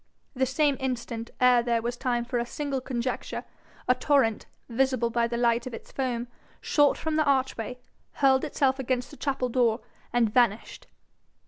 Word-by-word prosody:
The 260 -1 +1
same 285 +1 +2
instant, 235 -3 -3
ere 250 -1 +5
there 235 -1 0
was 240 +1 -2
time 245 -2 -1
for 245 0 -1
a - - 0
single 280 -1 -3
conjecture, 250 -1 -3 0.4
a 250 - +6
torrent, 255 -5 +1 0.2
visible 250 -1 +1
by 235 0 +1
the 235 0 -3
light 235 0 +2
of 245 - -5
its - - -12
foam, 245 -3 -2 0.3
shot 290 -2 +3
from 315 -1 -2
the 310 - +4
archway, 255 -3 0 0.4
hurled 265 -2 +3
itself 275 -3 +1
against 250 -1 -2
the - - -10
chapel 270 -3 -1
door, 235 -1 +2 0.3
and 230 -3 +2
vanished. 235 -3 +1
250 Hz, 165 wpm, -27 LUFS, 235-265 Hz, 0.4 s, a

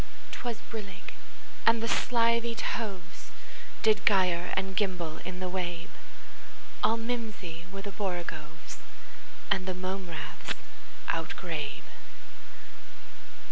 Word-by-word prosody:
'T - - -4
was 240 -2 0
brillig, 200 -5 -5 0.5
and 230 0 +7
the 230 - +1
slithy 235 -1 +4
tovesDid 215 +1 -1
gyre 180 -3 +5
and 190 0 +1
gimble 180 -6 +1
in 185 0 -5
the 185 - 0
wabe; 175 -2 -1 0.9
All 225 - +6
mimsy 215 -8 -2
were 195 0 -4
the 200 - -3
borogoves, 170 -5 -3 0.7
And 190 -2 +4
the 185 - +1
mome 185 0 -2
raths 150 -2 -3 0.5
outgrabe. 160 -3 -1
185 Hz, 100 wpm, -31 LUFS, 175-220 Hz, 0.9 s, and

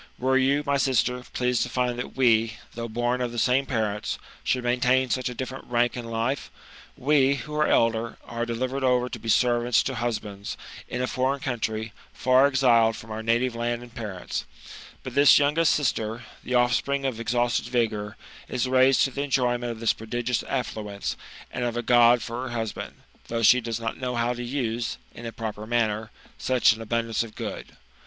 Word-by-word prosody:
Were 130 +1 +1
you, 135 +2 +3
my 140 -1 +2
sister, 125 -2 +1
pleased 125 -1 0
to - - -1
find 125 0 -1
that 125 - -6
we, 115 -3 +3 0.2
though 115 0 -4
born 120 +2 -1
of 125 -1 -1
the 120 - -7
same 130 +4 +2
parents, 110 -5 -1 0.3
should 125 -1 0
maintain 125 +1 +2
such 130 -1 0
a 125 - -7
different 130 +2 -6
rank 120 0 +1
in 120 -2 -5
life? 115 +4 -2 0.5
We, 140 0 +3
who 150 +2 -7
are 150 0 +2
elder, 115 0 +1
are 120 0 -4
delivered 130 +3 -2
over 125 -1 +2
to 120 - -6
be 115 +1 -6
servants 120 +1 +3
to 135 - -2
huslKinds, 110 -4 -4 0.3
in 125 - -3
a - - +2
foreign 130 +3 0
country, 110 -4 -3 0.2
far 130 +2 +4
exiled 120 -5 +4
from 110 - -10
our 110 +1 -4
natite 120 +2 +1
land 120 +1 -2
and 120 -1 -14
parents; 105 -7 -5 0.6
but 130 - -6
this 140 +1 +7
youngest 150 +3 +3
sister, 115 -5 -1 0.2
the 125 - -2
offspring 125 +3 +2
of 125 -4 -2
exhausted 120 +1 0
vigour, 110 -4 -1 0.3
is 125 0 -1
raised 130 +1 +5
to 135 - +1
the 140 - -3
enjoyment 125 -3 0
of 115 - -7
this 115 -1 +2
prodigious 120 +2 -2
affluence, 110 -6 -3 0.4
and 125 - -3
of 120 -1 -1
a 120 - -1
God 120 0 +5
for 115 +2 -4
her 130 - -4
husband, 110 -2 -4 0.3
though 115 0 -2
she 125 +3 +6
does 115 -1 -3
not 115 -1 -4
know 125 -1 -2
how 120 +1 +1
to 120 - -6
use, 120 -2 -2 0.2
in 120 - -8
a - - -5
proper 110 -2 -6
manner, 110 -2 0 0.3
such 130 -3 +4
an 110 - -9
abundance 115 0 -1
of 115 -2 -6
good. - - -6
120 Hz, 190 wpm, -26 LUFS, 115-130 Hz, 0.6 s, this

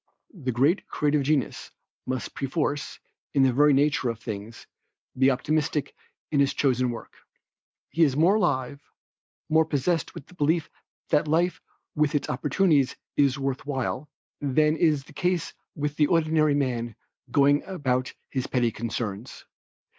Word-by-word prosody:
The 140 -10 -3
great 140 - +2
creative 150 0 +1
genius, 140 -3 -1 0.4
must 130 -1 -3
perforce, 145 +1 -2 0.4
in 135 - +5
the 130 -2 +3
very 145 +3 +5
nature 140 -2 +2
of 115 -1 -4
things, 110 +1 -7 0.5
be 130 +1 +4
optimistic 150 +3 0 0.4
in 145 - +2
his 140 -1 +2
chosen 130 -3 +2
work. 120 - -7 0.8
He 165 - -1
is 140 -3 +2
more 170 +6 +5
alive, 140 - 0 0.7
more 160 +1 +4
possessed 160 +1 -1
with 140 - -8
the - - -18
belief 160 0 0 0.4
that 150 +1 +2
life 170 +4 +1 0.3
with 150 -1 +1
its 145 - -1
opportunities 145 +1 +2 0.2
is 140 -1 +3
worth 135 -1 -2
while, 135 +1 -3 0.3
than 150 +2 +2
is 155 -3 +2
the - - -17
case 180 -2 -1 0.2
with 150 -1 -2
the 150 - +4
ordinary 155 -3 +3
man 120 -5 -1 0.3
going 145 +3 +4
about 130 -8 -1 0.2
his 130 -2 -2
petty 120 -3 +1
concerns. 115 0 -5
145 Hz, 145 wpm, -26 LUFS, 130-155 Hz, 0.8 s, in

